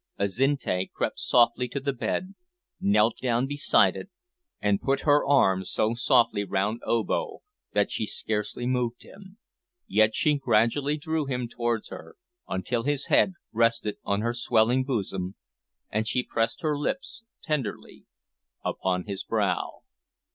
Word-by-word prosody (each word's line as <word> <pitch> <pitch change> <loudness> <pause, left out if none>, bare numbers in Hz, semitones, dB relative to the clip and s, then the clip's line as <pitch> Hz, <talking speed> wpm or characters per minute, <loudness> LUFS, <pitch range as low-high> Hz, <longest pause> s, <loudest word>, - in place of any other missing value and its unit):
Azinte 100 -2 0
crept - - -3
softly 120 0 +3
to 140 - -4
the 140 0 -2
bed, 135 - -3 0.5
knelt 105 +3 +3
down 125 0 +1
beside 145 +2 +3
it - - -7 0.5
and 100 -1 +1
put 135 0 0
her 145 -1 +4
arms 95 -10 +3
so 110 +1 +1
softly 115 -3 +3
round 100 +4 -1
Obo 115 -3 -1 0.3
that - - +2
she - - -2
scarcely 105 +2 -3
moved 125 -1 -1
him, 195 0 -15 0.5
yet 110 0 +3
she 150 -2 +2
gradually 135 +4 +2
drew 155 -1 -2
him 125 -2 -2
towards 120 -2 -2
her - - -10 0.3
until 115 +6 -1
his 145 +2 0
head 190 - +5 0.2
rested 115 -2 +1
on 100 +1 0
her 120 +1 0
swelling 120 +1 +2
bosom, 95 -7 -3 0.6
and 110 +1 -1
she 125 +3 0
pressed 115 +5 -1
her 155 -1 +1
lips 245 - -3 0.2
tenderly 140 -9 -4 0.6
upon 90 -1 -1
his 100 -2 -5
brow. - - -1
120 Hz, 140 wpm, -27 LUFS, 105-140 Hz, 0.6 s, head